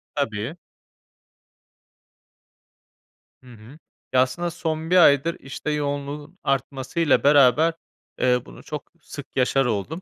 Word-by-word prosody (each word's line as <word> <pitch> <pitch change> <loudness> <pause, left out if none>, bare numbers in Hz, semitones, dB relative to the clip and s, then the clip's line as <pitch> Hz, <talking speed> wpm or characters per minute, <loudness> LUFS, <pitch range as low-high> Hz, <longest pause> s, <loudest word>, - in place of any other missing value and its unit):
Tabii. 120 +1 -2 2.9
Hı 125 -1 -14
hı. 115 +8 -15 0.3
Ya, 130 - +5
aslında 170 +7 -1
son 160 -1 -3
1 185 - +5
aydır, 160 0 +5
işte 140 +3 -5
yoğunluğun 145 +3 -4
artmasıyla 135 +3 0
beraber, 145 +3 +5 0.5
eee, 125 -1 +2
bunu - - -13
çok 150 -1 -7
sık 145 -2 -9
yaşar 135 +1 +2
oldum. 125 - -3
140 Hz, 110 wpm, -23 LUFS, 130-160 Hz, 2.9 s, Ya